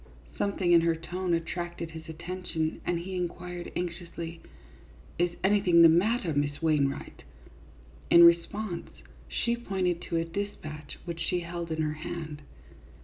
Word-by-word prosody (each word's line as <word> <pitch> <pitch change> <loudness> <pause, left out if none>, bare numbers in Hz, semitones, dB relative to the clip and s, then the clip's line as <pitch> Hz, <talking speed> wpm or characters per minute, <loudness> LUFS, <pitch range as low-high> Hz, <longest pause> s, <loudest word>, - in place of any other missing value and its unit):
Something 195 -3 +1
in 170 -1 +7
her 165 0 +2
tone 175 +2 -1
attracted 170 0 -4
his 160 0 -9
attention, 165 -1 -3
and 175 - +1
he 185 +3 -5
inquired, 175 0 -4
anxiously, 170 -1 -5 0.4
" 70 - -23
Is 175 0 +3
anything 190 -4 +5
the 165 - +10
matter, 180 +1 +2
Miss 145 0 0
Wainwright? 150 -4 0 0.5
" 60 +1 -23
In 170 - +9
response, 170 +3 +3 0.4
she 235 0 0
pointed 190 -7 -1
to 165 - +1
a 165 - +1
dispatch 165 -5 -6
which 170 -1 -5
she 180 -1 0
held 170 0 -5
in 160 0 0
her 150 0 0
hand. 155 -3 -5
170 Hz, 145 wpm, -29 LUFS, 160-180 Hz, 0.5 s, the